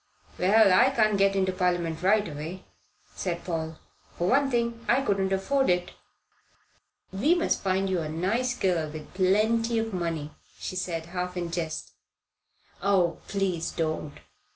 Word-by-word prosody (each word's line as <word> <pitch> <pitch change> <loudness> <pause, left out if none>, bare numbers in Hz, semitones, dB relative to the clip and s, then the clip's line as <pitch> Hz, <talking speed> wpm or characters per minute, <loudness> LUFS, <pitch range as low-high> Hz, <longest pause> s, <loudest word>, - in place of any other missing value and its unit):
"Well, 200 +1 +5
I 245 +8 +6
can't 215 -5 +2
get 195 0 +3
into 190 -1 +2
Parliament 175 -3 -1
right 205 +3 +3
away," 155 +4 -7 0.5
said 175 -2 -3
Paul. 160 -2 -3 0.4
"For 175 - 0
one 275 +5 +3
thing, 235 -2 -1
I 245 +4 +4
couldn't 195 -4 0
afford 265 +8 +1
it." 180 0 +1 1.2
"We 275 - +3
must 345 - 0
find 190 0 +1
you 185 -2 0
a 155 -2 -3
nice 220 +10 -1
girl 170 -5 0
with 155 0 -9
plenty 220 +5 +2
of 225 -1 -1
money," 165 -4 -3 0.3
she - - -5
said, 170 -3 -3
half 180 +1 -4
in 175 -1 -3
jest. 165 -2 -4 0.9
"Oh, 190 -3 +2
please 185 -4 -1
don't. 155 -2 -3
185 Hz, 150 wpm, -27 LUFS, 170-215 Hz, 1.2 s, I